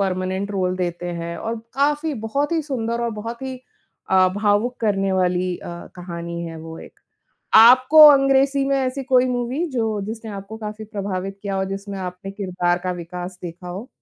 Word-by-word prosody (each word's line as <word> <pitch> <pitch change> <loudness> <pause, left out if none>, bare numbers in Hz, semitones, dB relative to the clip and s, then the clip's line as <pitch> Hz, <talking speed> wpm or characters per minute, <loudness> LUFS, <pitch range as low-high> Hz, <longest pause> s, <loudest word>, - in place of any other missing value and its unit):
Permanent 190 +1 -1
role 185 -1 0
देते 175 -1 -3
हैं 170 0 -5
और 225 +1 -3 0.2
काफ़ी 295 +3 +1
बहुत 285 +8 -1
ही 325 - +2
सुंदर 235 -5 -2
और 235 - 0
बहुत 230 +4 -6
ही 260 -1 -4 0.5
अ, 185 -1 +5
भावुक 210 +4 +1
करने 195 -3 +1
वाली 180 -1 +1
अ, - - -9 0.3
कहानी 170 -1 -6
है 165 0 -7
वो 160 0 -9
एक। - - -14 0.6
आपको 255 +7 +9
अंग्रेज़ी 275 -1 +4
में 275 - +2
ऐसी 265 +1 -2
कोई 255 -1 +4
मूवी 250 +6 -1
जो 225 -4 -1
जिसने 220 0 -6
आपको 200 +2 -8
काफ़ी 215 0 -7
प्रभावित 195 -2 -4
किया 195 -1 -2
और 190 - 0
जिसमें 195 0 -5
आपने 180 +1 -6
किरदार 180 -3 -1
का 185 - -1
विकास 180 +1 -7
देखा 175 +1 -7
हो? 195 +8 -6
205 Hz, 175 wpm, -22 LUFS, 185-250 Hz, 0.6 s, आपको